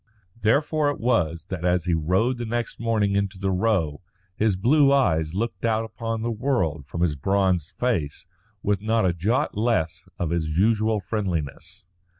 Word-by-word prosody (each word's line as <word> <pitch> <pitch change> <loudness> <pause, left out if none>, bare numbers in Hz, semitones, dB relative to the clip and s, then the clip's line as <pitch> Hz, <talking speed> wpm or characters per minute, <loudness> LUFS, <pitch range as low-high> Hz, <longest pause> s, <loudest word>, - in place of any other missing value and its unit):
Therefore 145 +6 +2
it 145 - -3
was 85 -9 0
that 90 -3 -4
as 90 -1 +1
he 90 - +1
rode 95 +11 +1
the 120 - -3
next 120 0 -3
morning 110 -3 +1
into 100 -1 -1
the 95 0 -1
Row 90 -7 0 0.3
his 105 -2 +2
blue 140 +8 +4
eyes 80 - +2
looked 115 +4 -3
out 115 -1 +1
upon 115 0 -4
the 120 - -1
world 105 - -1
from 85 - -5
his 85 -4 +2
bronzed 95 0 0
face 85 - -1 0.4
with 100 -2 0
not 110 -1 +1
a 90 - +2
jot 100 +9 0
less 105 -7 -1
of 85 -2 -2
his 80 -2 -1
usual 110 +2 +2
friendliness. 90 - -4
100 Hz, 165 wpm, -24 LUFS, 85-115 Hz, 0.4 s, blue